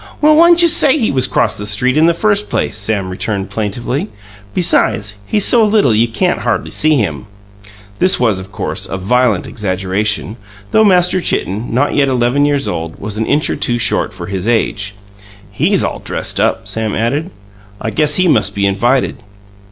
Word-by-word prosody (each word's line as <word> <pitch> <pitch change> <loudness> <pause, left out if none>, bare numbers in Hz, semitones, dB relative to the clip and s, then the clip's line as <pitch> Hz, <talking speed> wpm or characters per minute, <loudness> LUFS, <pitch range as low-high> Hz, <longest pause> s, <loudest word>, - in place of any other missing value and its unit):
"Well, 305 0 +4
whyn't 340 +2 +5
you - - +6
say 310 -3 +3
he 230 -7 0
was 130 -1 +2
'cross - - 0
the 105 - -4
street 125 +6 +1
in 155 +2 +4
the 170 - +2
first 210 +2 +1
place?" - - -2
Sam 105 -2 -2
returned 100 +1 -4
plaintively. 120 - -3 0.5
"Besides, 110 - +1
he's 205 -2 +2
so 235 -2 +5
little 210 - +3
you 115 +2 +2
can't 110 -2 -1
hardly - - -2
see 155 0 +2
him." 80 - -2 0.7
This 185 +1 +3
was, 110 -6 +1
of 95 +1 -10
course, - - -4
a 95 - -4
violent 115 +1 +1
exaggeration, 100 +2 -2 0.3
though 220 - +4
Master 180 -2 +3
Chitten, 105 - -2
not 130 +5 0
yet 140 -1 +2
eleven 130 +2 +1
years 145 -1 0
old, 80 0 -5
was 105 +1 -5
an 110 - -1
inch 150 +1 +1
or - - -2
two 120 - -1
short 110 -1 0
for 95 -4 -8
his 95 +2 -4
age. 100 -3 -1 0.6
"He's 165 - +1
all - - -3
dressed - - -4
up," - - 0
Sam 110 -2 -2
added. 140 +10 -1 0.5
"I 110 - -4
guess 150 +1 +1
he 185 +2 +2
must 160 - +1
be 100 0 0
invited." 120 +9 0
120 Hz, 185 wpm, -14 LUFS, 105-160 Hz, 0.7 s, you